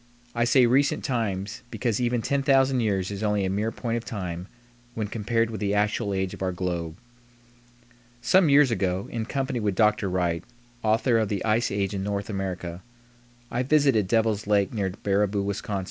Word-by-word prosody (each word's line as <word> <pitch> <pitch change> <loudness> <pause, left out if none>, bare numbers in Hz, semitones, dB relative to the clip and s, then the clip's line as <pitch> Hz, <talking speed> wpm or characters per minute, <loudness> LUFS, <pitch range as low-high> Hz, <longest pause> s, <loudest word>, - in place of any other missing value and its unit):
I 120 0 +1
say 125 +1 +5
recent 135 +4 +2
times, 110 -4 -2
because 120 -2 -1
even 120 -1 0
10,000 135 -2 +2
years 100 -4 0
is 100 0 -5
only 105 -2 +1
a 95 - -1
mere 105 +3 -1
point 115 -1 -3
of 115 - -5
time 90 -6 -5 0.5
when 110 - -2
compared 115 +2 -1
with 110 - -5
the 100 0 0
actual 105 0 0
age 95 -1 -1
of - - -10
our 95 -1 0
globe. 85 -2 -3 1.2
Some 175 +6 +4
years 140 -2 +5
ago, 95 -2 -1
in 115 -1 -3
company 135 -1 -2
with 105 -3 -1
Dr. 105 0 +2
Wright, 85 -2 -1 0.4
author 115 +2 +2
of 110 -2 0
the 100 0 -2
"Ice 115 +2 +2
Age 100 0 -1
in 95 - -2
North 100 +1 -3
America," 90 -3 -4 0.7
I 120 - 0
visited 135 -7 +3
Devil's 110 -1 +1
Lake 100 0 +2
near 100 -4 -1
Baraboo, 100 +1 0
Wis. 100 0 -2
105 Hz, 175 wpm, -26 LUFS, 95-120 Hz, 1.2 s, say